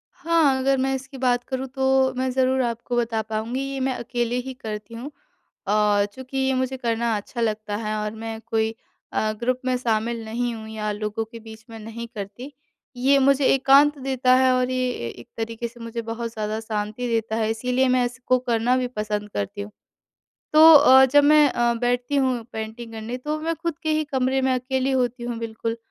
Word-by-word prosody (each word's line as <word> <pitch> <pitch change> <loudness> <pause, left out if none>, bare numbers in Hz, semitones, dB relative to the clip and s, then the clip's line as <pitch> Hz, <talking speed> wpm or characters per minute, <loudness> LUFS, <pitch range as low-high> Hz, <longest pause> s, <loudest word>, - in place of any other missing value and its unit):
हाँ, 325 -5 +2
अगर 270 +1 +2
मैं 265 +1 0
इसकी 270 +1 -8
बात 245 -2 +1
करूँ 260 0 -4
तो 265 0 +2
मैं 260 0 0
ज़रूर 260 0 +2
आपको 235 +1 -3
बता 230 -2 0
पाऊँगी 220 +4 -3
ये 270 - -3
मैं 260 0 0
अकेले 240 -1 -2
ही 265 - -5
करती 220 -2 -7
हूँ। 255 +6 -7 0.6
अ, 205 0 +3
चूँकि 260 +2 -7
ये 265 0 +1
मुझे 260 0 -1
करना 235 -2 0
अच्छा 235 +4 -6
लगता 215 -2 -1
है 215 -1 -3
और 210 0 -2
मैं 225 0 -6
कोई 225 0 -1 0.4
अ, 215 - +1
ग्रुप 255 +1 0
में 255 0 +1
शामिल 230 -1 -1
नहीं 240 +2 -2
हूँ 220 -1 -9
या 215 -1 -3
लोगों 210 +1 -3
के 230 - -9
बीच 220 0 -13
में 225 - -9
नहीं 225 +2 -7
करती। 210 +7 -7 0.4
ये 265 +3 +3
मुझे 275 0 +3
एकांत 275 +2 +5
देता 260 -1 +2
है 260 0 +4
और 255 0 +1
ये 255 0 0
ए 120 - -5
एक 120 0 -12
तरीके 230 +1 -3
से 240 +1 -16
मुझे 230 0 -5
बहुत 230 +1 -5
ज़्यादा 215 0 -3
शांति 215 +2 -3
देता 225 -2 -1
है 220 -1 0
इसीलिए 250 +3 +1
मैं 255 0 +3
इसको 255 +1 0
करना 240 0 +1
भी 255 -1 0
पसंद 210 -3 -3
करती 205 0 -4
हूँ। 205 +1 -8 0.8
तो 320 +1 +9
अ, 265 -3 +8
जब 290 +2 +4
मैं 300 0 +6
अ, 240 -1 +1
बैठती 245 +3 -1
हूँ 260 -4 +1
पेंटिंग 220 +1 -6
करने 225 +3 -5
तो 300 +4 -3
मैं 330 +1 -1
खुद 330 -1 -4
के 315 - -1
ही 310 0 +1
कमरे 265 0 +1
में 260 0 +2
अकेली 260 +1 -1
होती 250 -2 0
हूँ 240 -1 -4
बिल्कुल 230 0 -4
245 Hz, 200 wpm, -23 LUFS, 225-260 Hz, 0.8 s, तो